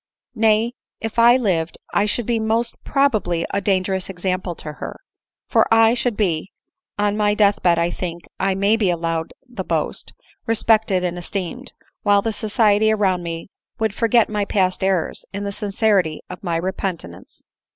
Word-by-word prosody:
Nay, 225 0 +2 0.3
if 225 +1 -3
I 240 +2 +7
lived, 175 -9 -1 0.2
I 205 - +3
should 230 +2 -1
be 235 0 0
most 225 +2 0
probably 215 - +1
a 200 - 0
dangerous 190 -1 0
example 185 -1 -2
to 150 - -8
ber; - - -5 0.5
for - - +2
I 225 0 +6
should 245 -2 -1
be 180 -4 -1 0.5
(on 205 0 +1
my 210 -1 +2
death 205 -1 +3
bed 175 -2 +3
I 170 +1 +1
think 170 -2 -5 0.2
I 190 0 +1
may 200 +3 +2
be 205 -5 +1
allowed 165 -1 -2 0.2
the 235 -6 -6
boast) 160 -4 -3 0.3
respected 220 -4 +2
and 175 0 -2
esteemed; 180 0 -5 0.3
while 205 -1 +3
the 225 - -1
society 215 0 +2
around 195 -4 +1
me 165 +1 -6 0.3
would 220 -3 0
forget 230 +1 +3
my 210 -1 -1
past 190 -2 0
errors, 190 -3 0
in 200 +1 -4
the 200 - -3
sincerity 200 -5 0
of 180 - -8
my 170 -3 -1
re 185 +3 -1
pentance. 170 - -6
200 Hz, 170 wpm, -21 LUFS, 180-220 Hz, 0.5 s, I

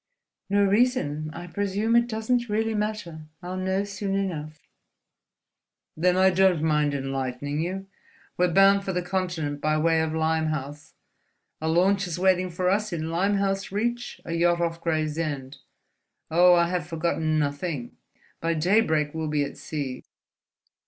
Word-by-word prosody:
"No 200 +1 +3
reason. 195 - +1
I 175 +2 -8
presume 205 +5 -1
it 235 0 +4
doesn't 235 +1 -1
really 220 +1 0
matter, 210 -7 -4 0.2
I'll 180 +1 -5
know 190 +1 0
soon 200 -1 -3
enough." 155 -6 -4 1.3
"Then 180 +3 +2
I 190 0 +5
don't 185 -3 +3
mind 150 -2 +2
enlightening 135 +1 -3
you. 190 +3 -3 0.5
We're 180 0 +2
bound 195 +2 +5
for 190 - -3
the 180 0 -1
Continent 175 -6 -2
by 155 +1 +1
way 160 +1 +2
of 160 0 -2
Limehouse. 155 -2 -2 0.7
A 160 - -2
launch 190 +4 +2
is 175 - -4
waiting 185 0 +2
for 180 +1 -2
us 210 +3 +1
in 165 -1 -3
Limehouse 195 +2 0
Reach, 235 +4 -2
a 165 - -4
yacht 170 +1 +2
off 165 -1 -2
Gravesend. 155 -4 -2 0.7
Oh, 175 +2 +6
I 170 0 +3
have 175 -4 -2
forgotten 160 -1 0
nothing! 145 -2 -2 0.4
By 165 0 0
daybreak 160 -4 +2
we'll 160 -1 -3
be 150 -1 +1
at 140 - -5
sea." 140 -5 -5
175 Hz, 145 wpm, -25 LUFS, 155-195 Hz, 1.3 s, Oh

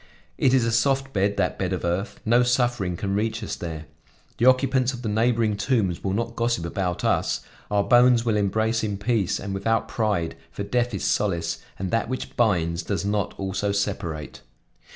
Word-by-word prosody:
It 130 0 +3
is 125 -3 +3
a 115 - +1
soft 135 +3 +1
bed, 100 +1 +1
that - - 0
bed 95 -1 -1
of 90 - -3
earth; 90 +6 -2
no 120 +2 +4
suffering 120 -7 +1
can 100 +1 -2
reach 110 +2 -1
us - - -3
there; 80 -2 -6 0.5
the 120 - +4
occupants 130 0 +3
of 125 0 -8
the - - -2
neighboring 110 0 +2
tombs 105 -5 0
will 95 - -1
not 115 +2 -2
gossip 115 -7 0
about 90 0 -2
us; - - +1 0.3
our 100 -1 +2
bones 120 +1 +5
will 115 -2 +2
embrace 110 +3 +1
in 105 -2 -2
peace 105 -2 0
and 100 -1 -5
without 115 +3 0
pride, 105 -8 -1
for 100 - -5
death 120 +1 0
is 95 - -4
solace, 85 -5 0 0.2
and 95 -1 -3
that 115 0 0
which 130 - -5
binds 85 -7 +1
does 95 +1 -2
not 100 0 -1
also 95 +1 -1
separate. 95 -6 -3
105 Hz, 190 wpm, -24 LUFS, 95-120 Hz, 0.5 s, bones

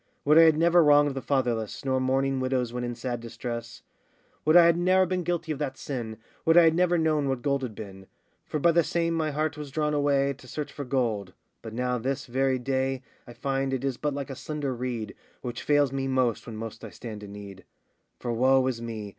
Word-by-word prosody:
Would 150 +3 +6
I - - +10
had 160 -2 +6
never 170 +1 +5
wronged 145 -1 +5
the 135 - -4
fatherless, 120 -5 -1
Nor 130 -1 +1
mourning 135 +1 +1
widows 130 -2 -1
when 125 0 -3
in 120 0 -3
sad 120 0 -4
distress; 115 0 -6 0.6
Would 155 +3 +6
I 175 - +8
had 170 0 +5
ne'er 185 +2 +3
been 185 0 -1
guilty 170 -1 -2
of 145 - -3
that 135 -3 -3
sin, 115 -6 -5 0.3
Would 165 +1 +4
I 175 - +9
had 165 -1 +5
never 175 +1 +2
known 155 -3 +1
what 130 -2 -2
gold 140 -1 +1
had 120 -5 -5
been; 95 -3 -9 0.4
For 155 - -2
by 170 +3 +4
the 170 0 +4
same 165 +2 0
my 160 -2 0
heart 155 +1 -2
was 150 -1 -6
drawn 150 +2 -1
away 140 -1 +2
To 125 - -14
search 150 +3 -5
for 145 - -6
gold: 115 -8 -1 0.3
but 110 -1 -8
now 125 0 -1
this 135 +3 -2
very 130 +1 +1
day, 130 +1 -1 0.2
I 120 - -10
find 135 0 -1
it 130 - -5
is 135 -3 -1
but 150 -2 -2
like 140 0 -5
a - - -5
slender 145 -1 -3
reed, 120 -4 -4 0.3
Which 120 -1 -5
fails 145 -2 +3
me 135 0 -2
most 130 -4 0
when 115 -2 -7
most 115 0 -7
I - - -6
stand 110 -3 -8
in 100 -1 -9
need; 100 -2 -10 0.5
For, 120 -1 -3
woe 130 +2 +4
is 125 -3 -2
me! 110 -3 -5
135 Hz, 230 wpm, -27 LUFS, 120-150 Hz, 0.6 s, I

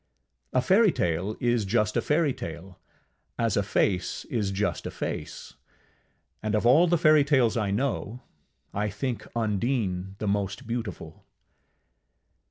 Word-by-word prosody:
A 130 - +2
fairytale 110 - +2
is 120 -2 +1
just 105 +1 +1
a - - +2
fairytale, 95 - -2 0.6
as 115 -3 +1
a 100 - +3
face 95 -2 0
is 105 -5 0
just 100 +2 -2
a - - -3
face; - - -6 0.9
and 110 0 -1
of 105 - 0
all 150 +9 +6
fairytales 145 -7 +4
I 110 -4 0
know, 120 +1 -2 0.5
I 105 +1 -1
think 115 +4 -4
Undine 105 -4 -1
the 105 - -4
most 100 -1 -1
beautiful. 110 -9 -5
110 Hz, 120 wpm, -27 LUFS, 100-125 Hz, 0.9 s, all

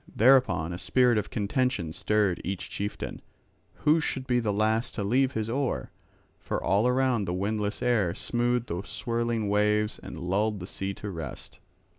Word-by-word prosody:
Thereupon 120 -9 +4
a 90 - -5
spirit 125 -1 +3
of - - -5
contention 105 - -1
stirred 105 -1 +1
each 95 -1 -4
chieftain, 100 +1 -4 0.6
who 155 +2 +5
should 135 -4 -2
be 125 -2 +2
the 110 -3 0
last 110 +3 +1
to 105 - -2
leave 130 +6 +2
his 110 -1 -2
oar. 130 +3 -2 0.5
For - - -3
all 100 +5 +2
around 125 -4 +2
the 90 -1 -2
windless 105 +2 -2
air 110 -8 +2
smoothed 120 0 0
the 85 +2 -2
swirling 115 0 -2
waves 105 +1 +1
and - - -8
lulled 100 +4 0
the 90 - -6
sea 95 +1 -4
to 105 - -6
rest. 80 -3 -8
110 Hz, 165 wpm, -28 LUFS, 100-125 Hz, 0.6 s, who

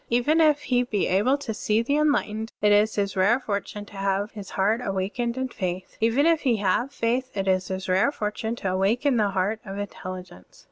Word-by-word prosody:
Even 270 +8 +3
if 300 -2 +4
he 245 -1 +2
be 220 -5 -1
able 210 +9 +2
to 285 -6 -5
see 215 +1 0
the 280 +5 0
enlightened, 225 -7 0
it 210 0 +3
is 210 +1 +4
his 200 -1 -1
rare 200 +6 +3
fortune 205 -2 -4
to 200 - -13
have 195 +1 -1
his 205 -2 -9
heart 210 +5 +1
awakened 215 +5 -2
in 260 0 -1
faith. 185 -5 -5
Even 230 +6 +3
if 330 -2 +3
he 250 -4 +2
have 210 +6 0
faith, 245 +3 -1
it 195 0 -1
is 185 -1 +1
his 190 0 -4
rare 190 +9 +3
fortune 220 -1 -3
to 195 -5 -3
awaken 230 +8 +1
the 210 -2 +2
heart 195 +3 -1
of 195 -3 -7
intelligence. 185 - -8
210 Hz, 205 wpm, -25 LUFS, 195-245 Hz, -, if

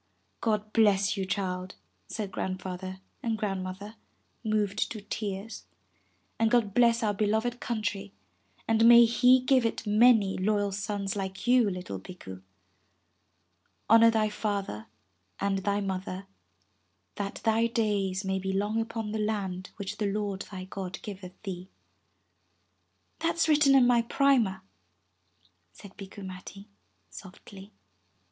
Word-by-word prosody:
'God 215 -1 -1
bless 200 -3 +3
you, 190 -2 -3
child,'' 185 -2 -3 0.3
said 205 -3 -5
Grandfather 185 0 -5 0.2
and 225 -2 -1
Grand 195 -3 -2
mother, 200 +4 -8 0.5
moved 215 -2 0
to 220 - -5
tears. 205 - -5 0.7
''And 225 0 +3
God 230 -4 +2
bless 235 0 +4
our 210 -1 +1
beloved 220 +4 0
country, 205 -3 -3 0.6
and 225 0 +3
may 235 0 +9
He 250 +2 +5
give 255 -1 +3
it 230 0 -2
many 210 -2 +4
loyal 205 +1 +1
sons 200 0 -3
like 190 -1 -5
you, 245 -3 +4
little 180 - -5
Bikku. 95 - -10 1.5
Honor 230 0 +8
thy 220 -1 +2
father 200 - -3 0.5
and 195 -1 0
thy 200 +1 0
mother 190 0 -4 0.9
that 200 -1 -3
thy 225 +1 +3
days 205 -4 -1
may 190 0 0
be 190 0 -3
long 205 +3 0
upon 225 -1 -4
the 220 - -2
land 195 -4 -2
which 200 0 -6
the 210 - 0
Lord 200 -2 -2
thy 185 -2 -7
God 185 -1 -6
giveth 185 -3 -9
thee." 185 -2 -6 1.5
"That's 330 0 +1
written 295 -3 +5
in 260 -2 +6
my 245 -1 +4
primer," 230 -7 +2 1.1
said 200 -2 -14
Bikku 195 0 -9
Matti 190 +2 -9 0.4
softly. 195 +1 -12
205 Hz, 130 wpm, -28 LUFS, 190-225 Hz, 1.5 s, may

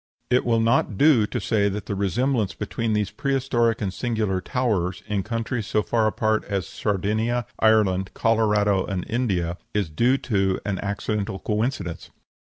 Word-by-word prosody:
It 125 - +3
will 115 -1 +2
not 115 -3 +2
do 135 -7 +5
to - - -3
say 100 -3 +1
that 100 0 -5
the - - -3
resemblance 105 +2 0
between 115 -2 -2
these 105 -1 0
prehistoric 120 -2 0
and 95 -2 -2
singular 105 -3 -1
towers, 95 -7 -1
in 105 -2 -1
countries 115 +1 -3
so 105 - +1
far 115 -2 +1
apart 110 0 +1
as 100 -4 -2
Sardinia, 110 +6 -1
Ireland, 100 -4 +3
Colorado, 105 -4 +2
and 95 -3 -3
India, 95 -8 -1 0.2
is 100 -7 0
due 120 - +3
to 95 -7 0
an 100 -3 -2
accidental 100 0 -2
coincidence. 105 -4 -2
105 Hz, 155 wpm, -24 LUFS, 100-115 Hz, 0.2 s, do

